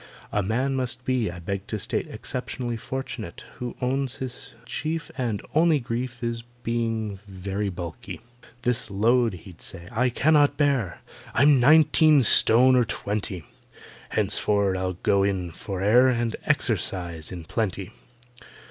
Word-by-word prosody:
A 105 - +1
man 125 +7 0
must 125 -1 -2
be, 125 -5 +1
I 85 - -7
beg 95 +3 -5
to 110 - -3
state, 100 - -2
Exceptionally 120 -2 -4
fortunate 120 -5 -6 0.2
Who 125 -1 -5
owns 135 0 0
his 130 +1 -5
chief 155 +7 -3
And 120 -6 -2
only 160 -1 +4
grief 120 0 -4
Is—being 115 -3 -3
very 100 +1 -3
bulky. 85 -3 -7 0.4
"This 125 -1 0
load," 115 +3 +2
he'd 90 0 -12
say, 85 -2 -7
"I 125 +2 +2
cannot 145 +3 +3
bear; 130 - 0 0.3
I'm 140 +2 +5
nineteen 155 +1 +6
stone 125 +3 +6
or 125 - +5
twenty! 100 -6 -3 0.6
Henceforward 100 -2 +1
I'll 95 0 -2
go 100 -1 +3
in 95 -3 -1
for 95 +3 -6
air 120 +6 +6
And 120 -3 0
exercise 85 -4 0
in 90 -2 -7
plenty." 100 +1 -3
115 Hz, 135 wpm, -25 LUFS, 100-130 Hz, 0.6 s, nineteen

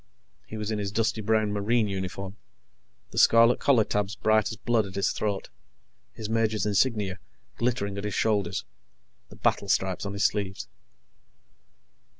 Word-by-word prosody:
He 110 - -7
was 105 0 -3
in 105 - -1
his 100 -1 -3
dusty 110 +1 0
brown 110 -1 +1
Marine 105 +2 +1
uniform, 95 0 -5 0.8
the - - -1
scarlet 115 +1 +6
collar 130 -6 +4
tabs 105 -1 -2
bright 110 0 +2
as 110 - -6
blood 115 -2 +1
at 95 - -10
his 100 - +1
throat, 100 -3 -3 0.6
his 110 - -7
major's 110 -1 0
insignia 105 -3 +1 0.4
glittering 100 -5 -1
at - - -6
his 105 -2 -3
shoulders, 100 -5 0 0.6
the - - -13
battle 100 - 0
stripes 95 +1 0
on 100 - -4
his 100 - 0
sleeves. 100 -2 -1
105 Hz, 150 wpm, -27 LUFS, 100-110 Hz, 0.8 s, scarlet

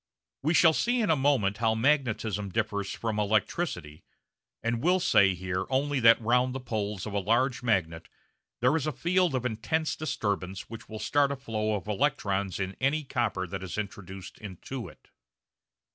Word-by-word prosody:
We 160 +5 +1
shall 160 -1 +6
see 245 +8 +1
in 215 -7 +2
a - - +5
moment 130 -8 +2
how 110 0 +2
magnetism 110 -6 +1
differs 100 -1 -1
from 110 0 -3
electricity, 100 - -1 0.6
and 115 0 -1
will 180 +4 +3
say 95 - +4
here 95 +1 -3
only 140 +1 +1
that 115 -1 +7
round 125 +3 +2
the - - -2
poles 105 -6 -3
of 105 - -6
a 100 - +1
large 120 +6 +1
magnet 90 -9 -1 0.5
there 125 +5 +4
is 155 -2 -1
a - - +1
field 175 +1 +1
of 125 -1 -2
intense 125 +8 -1
disturbance 100 -10 -3
which 115 -1 -10
will 110 - -6
start 140 +5 +2
a - - -1
flow 110 -5 -2
of 100 - -6
electrons 100 - 0
in 95 0 -3
any 145 +4 +1
copper 115 -9 -1
that 95 +1 -6
is 95 +1 -6
introduced 95 -3 -7
into 110 +5 -7
it. - - -17
115 Hz, 175 wpm, -28 LUFS, 100-135 Hz, 0.6 s, that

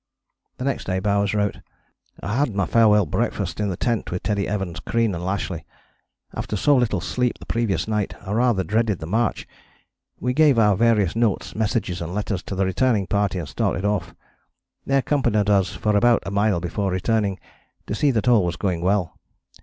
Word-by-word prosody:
The 125 - -4
next 140 - -2
day 95 0 -1
Bowers 100 +1 +1
wrote: 105 -1 0 0.6
"I 100 - -2
had 140 -7 0
my 100 -2 +1
farewell 105 -3 +4
breakfast 75 - -2
in 105 -1 0
the 90 - -3
tent 115 -3 -1
with 90 - -4
Teddy 100 -2 -1
Evans, 95 -5 -3
Crean 115 -3 0
and 85 0 -5
Lashly. 95 -3 -3 0.7
After - - -4
so 145 +8 +3
little 120 -6 +1
sleep 125 +7 -1
the - - -12
previous 105 -8 -1
night 105 -2 -1
I 95 - -5
rather 115 -3 +2
dreaded 110 +2 0
the 80 - -7
march. 110 +7 -1 0.7
We 125 0 -1
gave 150 -2 +4
our 105 -3 +4
various 105 -4 +2
notes, 115 -4 0
messages 105 -5 -1
and 85 +2 -5
letters 105 -2 -2
to 100 - -5
the 95 +1 +1
returning 100 +2 +1
party 100 -1 0
and 85 -5 -4
started 85 +5 -1
off. 105 -1 -1 0.7
They 135 - +3
accompanied 110 -7 +1
us 100 -2 +2
for 105 -1 0
about 120 +2 +4
a 100 - -4
mile 100 -2 +2
before 95 +4 -2
returning, 100 +1 0 0.5
to - - -4
see 145 +7 +2
that 115 -3 0
all 120 -5 +5
was 85 -1 -1
going 90 -3 -2
well. 95 -2 0
105 Hz, 190 wpm, -23 LUFS, 95-115 Hz, 0.7 s, all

